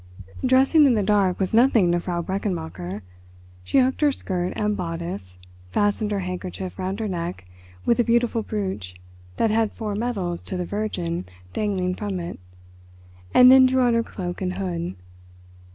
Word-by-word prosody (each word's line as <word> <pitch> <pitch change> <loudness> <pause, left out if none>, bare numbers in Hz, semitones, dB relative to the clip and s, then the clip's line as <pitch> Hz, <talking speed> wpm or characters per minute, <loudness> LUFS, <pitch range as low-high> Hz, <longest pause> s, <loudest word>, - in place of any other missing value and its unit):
Dressing 265 +4 +5
in 250 - +4
the 210 - +1
dark 195 -3 +2
was 190 0 -1
nothing 225 -6 +5
to 175 - +2
Frau 175 -1 -3
Brechenmacher. 160 - -4 0.6
She 90 - 0
hooked 260 +1 +3
her 295 -1 +5
skirt 180 -8 -3
and 210 0 0
bodice, 165 - -5 0.3
fastened 205 - +1
her 205 -2 -1
handkerchief 185 +1 -5
round 190 +2 -3
her 220 - -1
neck 175 - -4 0.4
with 235 - +3
a - - +5
beautiful 235 0 +2
brooch 190 - -4 0.4
that 225 - +2
had 220 -1 +2
four 215 -2 -4
medals 200 -6 -2
to 185 - -5
the 180 - -2
Virgin 180 -4 -3 0.3
dangling 190 -4 -1
from 200 -1 -3
it, 170 - -6 0.9
and 250 0 +8
then 260 0 +8
drew 260 0 +2
on 240 -1 +3
her 230 - +3
cloak 180 -5 -6
and 185 -1 -2
hood. 170 - -3
195 Hz, 165 wpm, -24 LUFS, 175-225 Hz, 0.9 s, and